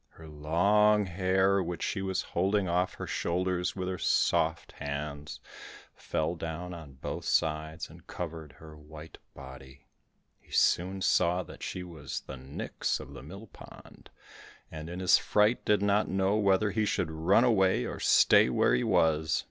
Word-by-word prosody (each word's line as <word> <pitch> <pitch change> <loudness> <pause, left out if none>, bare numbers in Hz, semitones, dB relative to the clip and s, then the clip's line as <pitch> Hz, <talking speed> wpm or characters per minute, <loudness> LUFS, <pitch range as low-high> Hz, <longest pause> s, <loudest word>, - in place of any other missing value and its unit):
Her 80 - -13
long 100 +8 +2
hair, 95 +2 +1
which 85 -2 -4
she 95 - -2
was 95 -1 -2
holding 95 +2 0
off 90 +1 0
her - - -6
shoulders 90 +1 -1
with 95 -1 -4
her 90 -1 -4
soft - - +1
hands, 70 +1 -6 0.6
fell 80 +2 -2
down 85 +1 -6
on 75 -5 -10
both 65 - -6
sides, 80 0 -1
and 85 +2 -17
covered 80 -4 -7
her 80 +2 -13
white 75 +1 -12 0.2
body. 65 0 -12 0.6
He - - -28
soon 95 +2 +1
saw 90 +2 +2
that - - -13
she 90 - -5
was 80 -6 -7
the 65 - -9
Nix 65 +2 -4
of - - -10
the - - -9
Mill 95 +10 -10
pond, - - -15 0.6
and 80 +1 -7
in 90 +1 -6
his 90 -1 +5
fright 105 +3 +2
did 105 -1 +2
not 100 +1 +2
know 95 +2 +1
whether 105 0 +2
he 110 +2 0
should 85 -5 -1
run 85 +8 +3
away 95 -6 +3
or - - -6
stay - - +5
where - - +2
he 60 - +2
was. 80 -1 +2
85 Hz, 165 wpm, -29 LUFS, 75-95 Hz, 0.6 s, his